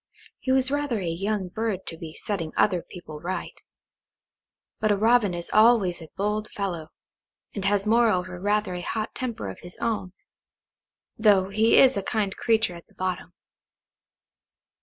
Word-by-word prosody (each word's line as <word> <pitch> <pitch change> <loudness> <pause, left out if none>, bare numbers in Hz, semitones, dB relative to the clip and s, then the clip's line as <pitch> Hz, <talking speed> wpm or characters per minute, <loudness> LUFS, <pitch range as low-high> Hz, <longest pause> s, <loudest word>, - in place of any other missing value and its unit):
He 260 - -1
was 265 0 +3
rather 285 -6 0
a 185 - -4
young 190 +3 -2
bird 220 -1 -3
to 165 - -5
be 160 -1 -9
setting 170 -7 -3
other 185 -4 +3
people 160 -4 -10
right; 180 +4 -5 1.2
but 215 - +2
a 205 - +3
Robin 220 -3 +3
is 170 0 -3
always 215 -6 +4
a 160 - -10
bold 210 +2 -1
fellow, 175 -6 -4 0.6
and 200 -2 -4
has 200 0 +2
moreover 190 -6 +2
rather 205 0 0
a 180 - -4
hot 215 +4 -3
temper 235 - -4
of 95 - -7
his 175 0 -8
own, 205 -5 -2 1.1
though 200 -3 +4
he 220 +3 +4
is 265 -3 +6
a - - 0
kind 200 -1 -1
creature 225 -5 +1
at 170 -1 -12
the - - -27
bottom. 185 -1 -3
200 Hz, 160 wpm, -25 LUFS, 180-220 Hz, 1.2 s, is